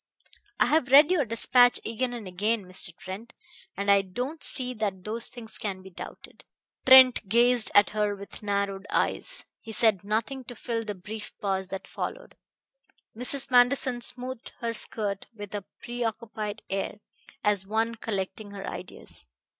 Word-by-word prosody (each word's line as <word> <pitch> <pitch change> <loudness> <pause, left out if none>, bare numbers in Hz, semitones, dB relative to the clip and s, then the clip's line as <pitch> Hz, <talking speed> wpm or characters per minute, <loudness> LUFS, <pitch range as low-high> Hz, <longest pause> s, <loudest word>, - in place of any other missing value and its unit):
I - - +6
have 300 -4 +2
read 290 +5 +8
your 325 -7 +3
despatch 245 +2 +4
again 240 +3 -1
and 235 -5 -6
again, 205 +3 0
Mr. 185 -1 +1
Trent, 205 +6 -8 0.4
and 200 0 +2
I 200 0 +6
don't 250 - -5
see 255 -2 -1
that 200 -5 -3
those 225 +3 -2
things 225 -3 -8
can 190 -3 -4
be 190 - -12
doubted." - - -10 0.4
Trent 260 -5 +8
gazed 240 +1 +4
at 205 - +6
her 210 -1 0
with 200 0 -10
narrowed 200 -1 -2
eyes. - - -1
He 225 - -9
said 215 -4 +2
nothing 225 +6 -2
to 245 - -8
fill 230 0 -3
the 210 -1 -4
brief 210 +3 -8
pause 190 -2 -1
that 195 0 -6
followed. - - -6 0.8
Mrs. 255 +3 +1
Manderson 245 0 +4
smoothed 250 0 -3
her 230 -1 -2
skirt 205 -3 -3
with 205 -1 -8
a 205 -2 -4 0.2
preoccupied 225 -3 -4
air, 195 +1 -2 0.5
as 200 -2 +2
one 225 +2 0
collecting 210 -2 -4
her 200 -1 -7
ideas. 65 - -8
220 Hz, 155 wpm, -27 LUFS, 200-245 Hz, 0.8 s, read